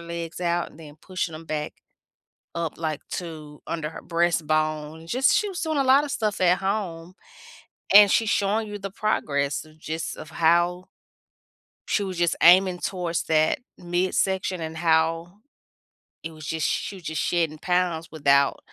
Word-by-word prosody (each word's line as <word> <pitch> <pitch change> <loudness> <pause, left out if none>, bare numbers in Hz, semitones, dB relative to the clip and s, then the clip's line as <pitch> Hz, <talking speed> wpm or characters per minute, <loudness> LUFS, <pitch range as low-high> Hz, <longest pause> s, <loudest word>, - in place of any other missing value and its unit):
legs 170 0 -6
out 175 0 0
and 165 - -16
then 150 -1 -12
pushing 185 -3 -4
'em 160 +1 -9
back 150 -1 -4 0.8
up, 170 -2 -2
like, 155 -3 -3
to, 155 -4 -7
under 160 -2 -3
her - - -9
breastbone, 155 -2 0
just 255 - +3
she 420 0 0
was 360 - -5
doing 315 -2 -1
a 275 - +3
lotta 275 +3 +4
stuff 215 -7 -2
at 180 0 +4
home, 185 -4 -3 0.8
and 205 -1 +9
she's 225 -2 +2
showing 210 +2 +1
you 210 - -6
the 195 -1 -6
progress 145 -9 -1
of 155 0 -19
just 160 +1 -4
of 155 - -9
how 175 +3 +2 1.0
she 205 - 0
was 190 -2 -5
just 175 -1 +1
aiming 180 +1 +6
towards 175 -3 -2
that 155 - +2 0.2
midsection, 185 +1 -1
and 160 0 -5
how, 165 +3 +1 0.8
it 165 - -5
was 155 -1 -11
just 160 -2 -1
she 200 - -2
was 180 - -14
just 160 -2 -3
shedding 165 -3 0
pounds 175 -2 0
without 140 -2 +3
170 Hz, 160 wpm, -25 LUFS, 160-190 Hz, 1.0 s, and